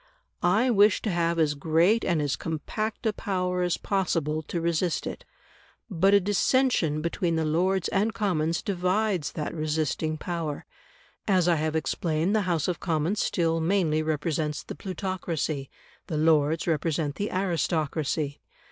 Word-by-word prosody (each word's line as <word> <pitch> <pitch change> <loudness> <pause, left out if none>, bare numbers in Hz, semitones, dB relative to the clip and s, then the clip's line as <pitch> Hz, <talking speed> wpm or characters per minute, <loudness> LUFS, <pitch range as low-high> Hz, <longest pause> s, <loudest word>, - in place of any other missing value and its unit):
I 220 +8 +3
wish 210 -1 +5
to 215 - 0
have 170 -1 +1
as 155 -3 +2
great 165 +9 +2
and 165 -4 +1
as 145 -2 0
compact 210 +9 -4
a 220 - +2
power 180 -3 -1
as 175 -1 +1
possible 165 -6 -1
to 170 +3 -4
resist 170 +1 0
it. - - -6 0.7
But 195 +3 +4
a - - +7
dissension 200 - +1
between 170 0 0
the 160 -1 0
Lords 180 +4 +1
and 205 +3 +1
Commons 170 -7 0
divides 185 -3 0
that 150 - -4
resisting 155 0 -1
power; 165 -3 -4 0.6
as 185 -4 +3
I 170 -2 +4
have 155 +1 -1
explained, 160 +4 0
the 200 -4 +1
House 165 -4 +1
of 180 - -2
Commons 165 +4 0
still 165 -1 +1
mainly 165 -2 +1
represents 155 -1 -1
the - - -7
plutocracy, 175 -7 -3 0.4
the 155 - -2
Lords 155 0 +3
represent 155 -2 0
the 205 - -2
aristocracy. 160 -5 -1
170 Hz, 145 wpm, -27 LUFS, 155-190 Hz, 0.7 s, a